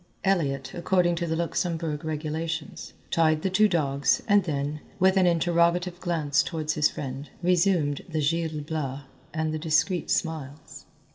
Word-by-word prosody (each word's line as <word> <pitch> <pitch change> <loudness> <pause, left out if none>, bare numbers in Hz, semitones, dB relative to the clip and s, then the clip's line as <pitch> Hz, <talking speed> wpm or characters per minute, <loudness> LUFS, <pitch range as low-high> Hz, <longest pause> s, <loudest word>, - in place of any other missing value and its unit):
Elliott, 140 -9 0
according 175 0 +2
to 170 0 -2
the 160 - -1
Luxembourg 165 -2 -2
regulations, 160 +1 -4 0.2
tied 155 -1 +2
the 190 - 0
two 215 +3 +5
dogs 140 - +1
and 205 -3 +4
then, 145 -1 -2 0.2
with 190 0 +4
an 185 -2 +4
interrogative 175 +1 +2
glance 165 -5 +1
toward 155 -3 -2
his 150 -1 +2
friend, 135 +1 -6
resumed 175 -5 +2
the 160 -2 -2
"Gil 160 0 0
Blas" 145 -3 -4 0.3
and 155 0 -2
the 155 - -2
discreet 160 +2 +1
smiles. 155 -3 -3
160 Hz, 145 wpm, -26 LUFS, 150-175 Hz, 0.3 s, two